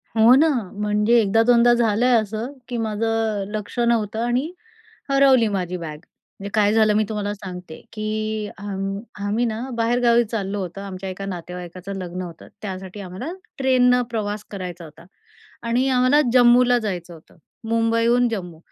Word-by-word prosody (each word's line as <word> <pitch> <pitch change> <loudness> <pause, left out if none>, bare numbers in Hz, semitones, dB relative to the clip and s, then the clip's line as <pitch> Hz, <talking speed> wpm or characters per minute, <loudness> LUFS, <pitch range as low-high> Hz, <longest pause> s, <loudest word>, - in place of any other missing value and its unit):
हो 225 +2 +7
ना, 315 +4 +5 0.3
म्हणजे 210 +3 +3
एकदा 220 +2 +3
दोनदा 240 0 +5
झालंय 235 +1 +2
असं 220 +3 -1 0.2
की 245 -1 -4
माझं 225 -1 -1
अ, - - -2
लक्ष 210 +1 -6
नव्हतं 225 -2 +1
आणि 255 +7 0 0.6
हरवली 270 -4 +5
माझी 185 -3 -2
बॅग. 160 -3 -6 0.4
म्हणजे 200 - -6
काय 210 -1 +3
झालं 215 -1 +4
मी 215 - +3
तुम्हाला 210 -1 -2
सांगते 180 -4 -9
की 215 0 -3
अ, - - -11 0.6
आम्ही 215 +4 0
ना, 220 -1 -3
बाहेरगावी 235 +1 +3
चाललो 205 -2 -3
होतो 185 +1 -6
आमच्या 195 -1 -6
एका 195 +1 -6
नातेवाईकाचं 180 +1 -7
लग्न 180 +1 -5
होतं, 170 -2 -10
त्यासाठी 190 0 -6
आम्हाला 195 - -6 0.3
ट्रेननं 250 -2 +4
प्रवास 210 -2 -3
करायचा 180 -3 -6
होता 160 +2 -14 0.6
आणि 250 +3 +2
आम्हाला 255 +3 +4
जम्मूला 245 0 +5
जायचं 180 -6 -5
होतं. 160 - -18 0.3
मुंबईहून 230 +2 +2
जम्मू. 180 -7 -5
215 Hz, 150 wpm, -22 LUFS, 195-235 Hz, 0.6 s, हो